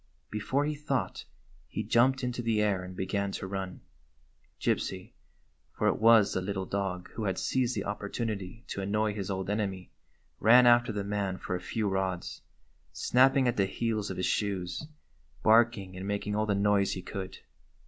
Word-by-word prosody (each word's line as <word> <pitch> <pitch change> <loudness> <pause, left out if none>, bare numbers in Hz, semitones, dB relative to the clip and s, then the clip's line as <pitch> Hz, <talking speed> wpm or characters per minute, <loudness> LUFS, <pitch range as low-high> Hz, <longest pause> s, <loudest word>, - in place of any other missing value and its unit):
Before 130 +7 0
he 150 - -1
thought 145 -3 -3 0.4
he - - -4
jumped 130 +3 +3
into 125 0 -2
the 115 -2 +1
air 105 -3 +1
and 90 0 -8
began 100 +2 -1
to - - -4
run. 95 -1 -5 0.8
Gypsy 95 -1 -1 0.3
— - - -42
for - - 0
it - - +1
was 110 -2 +6
the 95 - -1
little 95 0 -3
dog 95 -2 -3
who 110 - -4
had 95 -2 -1
seized 130 -1 0
the - - -2
op 105 +1 -4
portunity 105 0 -4
to 100 - -3
annoy 105 +2 0
his 100 -2 -4
old 95 -1 -2
enemy 100 -3 -2 0.2
— - - -41
ran 120 +4 +7
after 120 -1 +5
the 100 -1 -3
man 100 -2 -2
for 90 - -4
a 90 - -4
few 110 +3 -2
rods, 95 -2 -2 0.5
snapping 130 +1 +3
at 120 - 0
the 100 -1 +3
heels 110 0 -2
of 95 - -5
his 90 - 0
shoes, 95 +3 -1 0.6
barking 110 -4 +4
and 95 +1 -6
making 100 0 -2
all 110 +1 0
the 100 - +2
noise 100 0 +2
he 90 - -6
could. 95 -1 -6
100 Hz, 185 wpm, -29 LUFS, 95-115 Hz, 0.8 s, ran